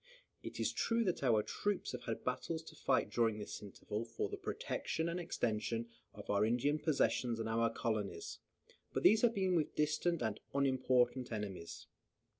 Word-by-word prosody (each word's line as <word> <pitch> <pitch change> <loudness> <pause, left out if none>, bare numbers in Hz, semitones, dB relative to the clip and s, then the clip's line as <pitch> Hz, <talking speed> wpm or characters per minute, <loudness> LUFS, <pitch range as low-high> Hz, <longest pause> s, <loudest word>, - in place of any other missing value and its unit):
It - - -7
is - - +1
true 230 0 +2
that 180 -5 0
our 115 -6 +4
troops 205 - -1
have 125 - -6
had 115 -2 -3
battles 160 +6 -2
to - - -12
fight 130 - +1
during 115 -2 +2
this 105 - -6
interval 105 +2 -5
for 115 -1 -3
the - - -3
protection 160 +1 -2
and 170 +1 -1
extension 115 -7 -1 0.3
of 105 - -9
our 100 0 +3
Indian 125 +7 +2
possessions 125 -6 +1
and 115 - -2
our 115 +1 +2
colonies; 105 -7 -2 0.5
but - - -1
these 215 +2 +7
have 235 -1 +4
been 190 -2 +2
with 160 -4 +1
distant 155 +1 +1
and 110 -2 -1 0.2
unimportant 130 -2 +2
enemies. 100 -6 -5
120 Hz, 170 wpm, -36 LUFS, 110-160 Hz, 0.5 s, these